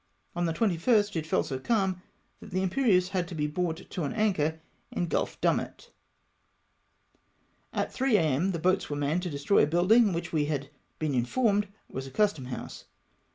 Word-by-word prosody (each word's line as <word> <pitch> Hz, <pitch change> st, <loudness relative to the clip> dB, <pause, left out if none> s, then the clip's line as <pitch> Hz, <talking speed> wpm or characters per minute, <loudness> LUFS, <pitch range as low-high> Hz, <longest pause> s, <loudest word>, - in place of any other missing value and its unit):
On 175 Hz, 0 st, 0 dB
the 165 Hz, -, -1 dB
21st 205 Hz, +2 st, +2 dB
it 160 Hz, -1 st, -2 dB
fell -, -, +2 dB
so 130 Hz, -2 st, -4 dB
calm, 190 Hz, -, 0 dB, 0.4 s
that -, -, -11 dB
the 185 Hz, 0 st, -1 dB
Imperieuse 190 Hz, -3 st, +2 dB
had 185 Hz, -3 st, -1 dB
to 175 Hz, -, -7 dB
be 150 Hz, -1 st, 0 dB
brought 165 Hz, +2 st, -2 dB
to 180 Hz, -, -4 dB
an 145 Hz, -, -2 dB
anchor 170 Hz, -8 st, +1 dB, 0.3 s
in 175 Hz, -, -2 dB
Gulf 170 Hz, -, -2 dB
Dumet. -, -, -1 dB, 1.8 s
At -, -, -2 dB
3 260 Hz, -4 st, +3 dB
a.m. 160 Hz, +2 st, +1 dB
the 170 Hz, -, -2 dB
boats 180 Hz, +3 st, +1 dB
were 145 Hz, -, -2 dB
manned 145 Hz, +4 st, 0 dB
to 180 Hz, -, -3 dB
destroy 145 Hz, +6 st, +2 dB
a -, -, +4 dB
building 195 Hz, +7 st, +4 dB
which 170 Hz, 0 st, -4 dB
we 150 Hz, -2 st, +2 dB
had 145 Hz, -2 st, -3 dB, 0.3 s
been 155 Hz, -2 st, -1 dB
informed 205 Hz, -, +1 dB, 0.2 s
was 130 Hz, +1 st, -6 dB
a -, -, -7 dB
custom 160 Hz, -2 st, +1 dB
house. 125 Hz, 0 st, -7 dB
175 Hz, 180 wpm, -28 LUFS, 150-200 Hz, 1.8 s, a